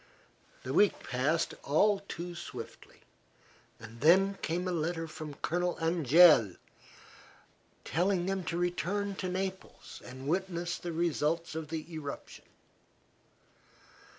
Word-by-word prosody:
The 130 - -4
week 205 +6 +3
passed 140 +6 0
all 200 +8 +3
too 175 +1 -6
swiftly, 135 -9 -9 0.8
and 115 +1 -12
then 195 +5 +5
came 175 +3 -2
a - - -1
letter 165 0 -2
from 155 -2 -8
Colonel 175 +1 0
Angeli 165 - +5 1.3
telling 180 +1 +1
them 190 0 -1
to 170 - -2
return 180 +3 -1
to 185 - -3
Naples 190 +1 -5
and 130 +2 -9
witness 175 0 -1
the 175 - -5
results 165 0 0
of 160 -1 -5
the 155 0 -4
eruption. 145 -3 -7
170 Hz, 115 wpm, -31 LUFS, 155-180 Hz, 1.3 s, then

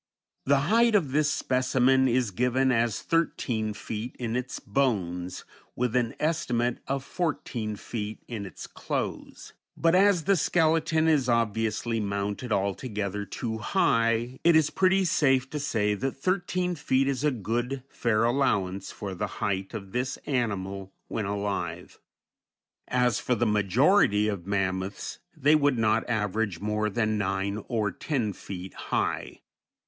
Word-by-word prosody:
The 140 0 +4
height 225 +8 +4
of 160 -10 +2
this 145 +1 +2
specimen 130 -1 +2
is 125 -3 +1
given 125 +5 +2
as 115 -2 +1
thirteen 115 -10 0
feet 110 +3 -5
in 115 -2 -3
its 125 0 -3
bones, 90 -9 -1 0.3
with 125 -1 -1
an 120 -2 +1
estimate 125 -7 0
of 135 0 -1
fourteen 135 - -3
feet 105 0 -6
in 105 -4 -5
its 95 - -9
clothes; - - -5 0.2
but 165 0 +3
as 190 -2 +4
the 200 +3 +3
skeleton 160 0 +2
is 145 -6 +3
obviously 115 0 0
mounted 100 +3 -3
altogether 100 0 -2
too 110 +3 -4
high, 115 - +1
it 170 -1 +6
is 155 -1 +4
pretty 190 0 +3
safe 135 -6 +3
to 150 - -3
say 110 -8 0
that 130 +6 -2
thirteen 180 +2 0
feet 135 -4 +1
is 135 -1 -1
a 150 - +4
good, 120 +2 -2
fair 115 -4 0
allowance 105 -7 +1
for 100 -2 -6
the 105 +3 -2
height 95 -1 -1
of 100 -3 -7
this 125 +3 -2
animal 100 -7 -2 0.2
when 110 - -2
alive. 100 0 -3 0.9
As 125 -3 +2
for 125 - 0
the 120 - +1
majority 105 - +3
of 100 -4 -3
mammoths, 95 0 -2 0.2
they 145 +1 +4
would 145 -4 +3
not 110 +1 +1
average 105 -4 -1
more 105 +1 -1
than 110 0 0
nine 100 +1 -1
or 110 -4 0
ten 115 - -2
feet 95 0 -8
high. - - -2
120 Hz, 145 wpm, -27 LUFS, 105-140 Hz, 0.9 s, it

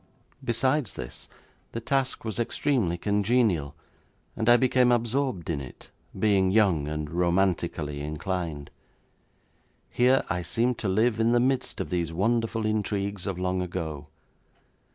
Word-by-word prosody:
Besides 130 +2 0
this, 65 -1 -8 0.4
the 115 - -2
task 130 +1 -1
was 110 0 -3
extremely 120 - 0
congenial, 100 - +1 0.6
and 110 +1 0
I 120 - +8
became 125 -1 +3
absorbed 120 - 0
in 75 -4 -2
it, 65 - -11 0.3
being 100 -3 +3
young 95 -8 +3
and 75 0 -3
romantically 85 -3 0
inclined. 75 0 -4 1.2
Here 130 +2 +3
I 90 - -1
seemed 120 +7 0
to 105 - -1
live 110 +3 +2
in 115 +1 +3
the 120 - +4
midst 130 +1 0
of - - -4
these 85 -2 -1
wonderful 115 +4 0
intrigues 100 -2 -2
of 95 -3 -2
long 90 0 -1
ago. 80 -4 -4
100 Hz, 135 wpm, -27 LUFS, 85-120 Hz, 1.2 s, I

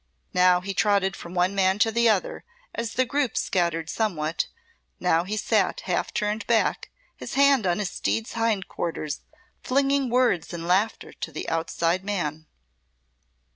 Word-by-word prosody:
Now 180 0 +5
he 195 +2 -4
trotted 195 -2 +2
from 170 +1 -9
one 180 +2 +2
man 190 -1 +2
to 225 +1 +3
the 235 +1 +3
other - - 0 0.3
as 230 -1 -4
the 255 - +2
group 275 -1 -1
scattered 170 -3 0
somewhat; 165 -6 -1 0.5
now 165 +2 +2
he 210 +3 -3
sat - - +1
half - - -1
turned 210 +1 -2
back, 230 -2 +1 0.3
his - - -7
hand 275 -6 +4
on 175 0 +1
his 200 -3 -2
steed's 225 0 -2
hind 225 -4 0
quarters, 155 -3 -4 0.4
flinging 275 0 +1
words 240 -10 +1
and 165 0 -6
laughter 195 +5 0
to - - -6
the - - -6
outside 165 +2 0
man. 160 -6 -3
200 Hz, 155 wpm, -25 LUFS, 175-230 Hz, 0.5 s, Now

